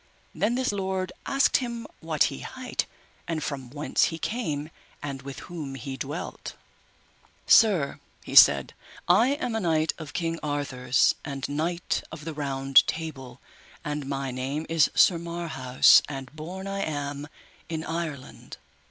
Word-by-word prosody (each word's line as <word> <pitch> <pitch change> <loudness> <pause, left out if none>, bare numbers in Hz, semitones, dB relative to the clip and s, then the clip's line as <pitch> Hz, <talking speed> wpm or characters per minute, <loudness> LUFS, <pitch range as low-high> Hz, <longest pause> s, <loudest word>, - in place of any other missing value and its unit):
Then 230 +3 0
this 255 -1 0
lord 190 -2 -2 0.2
asked 275 0 +3
him 235 -3 -4
what 160 -3 +1
he - - -7
hight, - - -4 0.4
and 160 -3 -2
from 135 -4 -4
whence 145 +3 +1
he 165 - -3
came, 160 -8 -3 0.3
and 140 -2 -5
with 135 0 -8
whom 150 -6 -7
he 135 +1 -6
dwelt. 140 +5 -6 0.9
Sir, 190 -11 +5 0.2
he - - -8
said, - - +7 0.3
I 225 +10 +5
am 250 -5 -3
a - - +1
knight 160 -4 +1
of 155 -2 -8
King 165 -1 -2
Arthur's 135 -4 +1
and 140 -2 -4
knight 165 +4 -1
of 155 -1 -8
the 160 - -4 0.5
Table 155 -5 -4
Round, 125 - -15 0.5
and 145 -2 -3
my 135 -1 -2
name 135 +5 -3
is 165 -2 +3
Sir 175 -3 +5
Marhaus, 165 -7 +4
and 135 0 -7
born 180 +5 -7
I 195 0 -3
am 145 -4 -3 0.4
in 160 -1 -3
Ireland. 160 -6 -6
155 Hz, 145 wpm, -26 LUFS, 140-175 Hz, 0.9 s, said